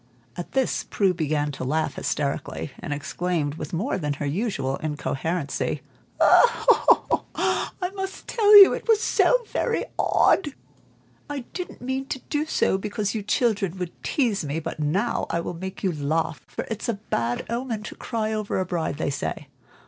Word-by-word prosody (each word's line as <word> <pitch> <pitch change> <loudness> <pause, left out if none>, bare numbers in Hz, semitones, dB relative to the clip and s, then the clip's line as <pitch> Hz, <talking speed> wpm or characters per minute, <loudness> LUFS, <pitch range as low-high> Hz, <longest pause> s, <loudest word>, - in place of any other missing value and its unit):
At 175 - -7
this 265 -2 +1
Prue 195 -3 +1
began 150 -3 -1
to 135 - -6
laugh 155 +5 0
hysterically, 140 0 -3
and 175 - -6
exclaimed, 150 +1 -2
with 150 -2 -7
more 190 +5 -1
than 150 -3 -1
her 145 +1 -4
usual 140 - -1
incoherency 150 +1 -2 0.4
"I 475 - +3 0.2
must 385 -1 -6
tell 420 -3 +7
you, - - +3
it - - -5
was 445 -2 +5
so - - +3
very - - 0
odd! 295 -7 +3 0.7
I 290 -2 -3
didn't 360 - -6
mean 265 +1 -2
to 265 - -3
do 300 +1 0
so, 190 - +1
because 205 0 -2
you 220 - -2
children 205 -3 0
would 180 -2 -4
tease 235 - 0
me; 145 +2 -2
but 155 - -6
now 185 +11 0
I 170 - 0
will 170 - -4
to 165 - -10
make 190 +2 -6
you 190 - +2
laugh, 155 +1 -1
for - - -5
it's 225 +2 -3
a 230 - +1
bad 120 - -2
omen 235 -2 -3
to - - -7
cry 220 -2 -3
over 215 -3 -1
a 185 - 0
bride, 165 -5 -2
they 145 - -1
say. 140 - -4
185 Hz, 170 wpm, -25 LUFS, 150-235 Hz, 0.7 s, tell